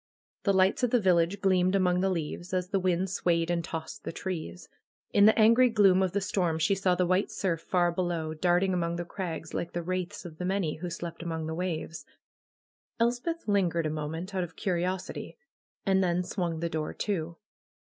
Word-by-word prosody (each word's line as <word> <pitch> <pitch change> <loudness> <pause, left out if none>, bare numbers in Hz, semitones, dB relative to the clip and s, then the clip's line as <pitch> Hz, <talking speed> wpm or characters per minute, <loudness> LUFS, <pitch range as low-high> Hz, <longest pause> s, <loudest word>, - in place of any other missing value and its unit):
The 200 - +4
lights 190 +4 +3
of 245 - +2
the 245 - +3
village 185 0 +2
gleamed 185 -1 +3
among 180 -2 +2
the 195 - +2
leaves, 175 +1 -3
as 180 -1 -1
the 195 0 +1
wind 185 0 +1
swayed 175 -3 0
and 170 -1 0
tossed 160 -1 -6
the - - -4
trees. 180 0 -5 0.5
In 205 0 +7
the 220 - +5
angry 230 +3 +6
gloom 195 -4 +5
of 185 -2 0
the 200 - 0
storm, 180 -4 0
she 160 +5 +2
saw 190 -2 +2
the 180 0 +2
white 185 +3 +1
surf 170 -4 -2
far 175 0 +1
below, 170 -3 -2
darting 180 +3 +2
among 170 -1 0
the 175 0 -4
crags 170 -4 -5
like 170 - -3
the 175 - -2
wraiths 185 +2 -3
of 160 -3 -10
the 180 - -2
many 185 -5 -1
who 175 +2 -5
slept 170 0 -6
among 165 -2 -3
the 160 - -3
waves. 165 -1 -3 1.0
Els 235 +1 +2
peth 335 +2 -4
lingered 180 -5 +2
a 155 - 0
moment 160 +5 -4
out 185 -1 0
of 170 -1 -8
curiosity, 185 - -3 0.5
and 190 -1 +3
then 180 0 +1
swung 175 -3 -3
the 170 - 0
door 155 -1 -3
to. 170 -5 -2
180 Hz, 200 wpm, -29 LUFS, 170-190 Hz, 1.0 s, In